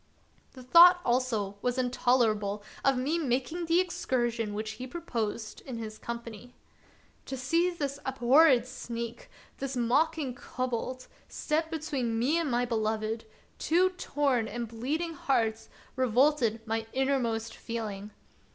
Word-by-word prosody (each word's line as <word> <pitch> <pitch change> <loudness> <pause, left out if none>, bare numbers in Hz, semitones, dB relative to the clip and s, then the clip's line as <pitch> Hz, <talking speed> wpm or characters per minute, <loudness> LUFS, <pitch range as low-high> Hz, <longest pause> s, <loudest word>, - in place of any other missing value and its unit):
The 255 - -11
thought 345 +7 +8
also 230 -5 0
was 250 0 -1
intolerable 230 -5 +1 0.2
to 270 -1 +4
me 275 +6 0
of - - -2
making 270 +7 -1
the 335 +2 +4
excursion 240 - -1
which 215 +1 -3
he 250 +4 -7
proposed 230 -9 -4
in 255 -3 -7
his 215 -1 -7
company. 235 0 -7 0.7
To 265 - -4
see 330 +8 +2
this 285 -5 -4
abhorred 265 0 +4
sneak, 235 -2 -6 0.3
this 270 -1 -3
mocking 280 +3 +1
kobold, 255 +1 -4 0.2
step 320 +1 -1
between 285 -8 -2
me 275 +9 +2
and 325 -4 -1
my 245 0 +1
beloved, 220 -1 -1 0.3
two 360 +3 +3
torn 280 -9 0
and 240 0 -4
bleeding 290 +10 -3
hearts, 225 -7 0 0.3
revolted 250 -2 +2
my 225 0 -2
innermost 250 -5 0
feeling. 210 -3 -5
250 Hz, 130 wpm, -29 LUFS, 225-285 Hz, 0.7 s, thought